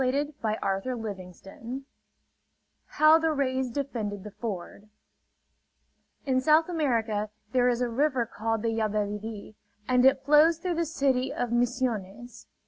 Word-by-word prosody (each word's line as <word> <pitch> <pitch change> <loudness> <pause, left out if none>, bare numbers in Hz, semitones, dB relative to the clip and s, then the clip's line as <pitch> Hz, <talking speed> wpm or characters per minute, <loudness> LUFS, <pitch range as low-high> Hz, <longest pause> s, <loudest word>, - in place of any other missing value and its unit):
SOUTH 255 0 +1
AMERICAN 290 -6 -2 0.3
JUNGLE 210 -7 -5
TALES 235 +7 -7 1.1
HOW 310 +1 +6
THE 320 0 +1
RAYS 260 -2 0
DEFENDED 230 -7 -4
THE 210 - -8
FORD 205 -1 -7 1.4
In 260 -2 +1
South 310 +3 +4
America 230 -11 0 0.2
there 250 -1 +3
is 245 0 0
a 245 - +1
river 260 0 +1
called 225 0 -3
the 230 - +1
Yabebirì; 215 -1 -3 0.3
and 250 -1 +3
it 265 0 +4
flows 300 +3 +5
through 355 +2 -2
the 335 0 -1
city 270 -4 0
of 245 -1 -3
Misiones. 240 -2 -2
245 Hz, 135 wpm, -27 LUFS, 220-275 Hz, 1.4 s, HOW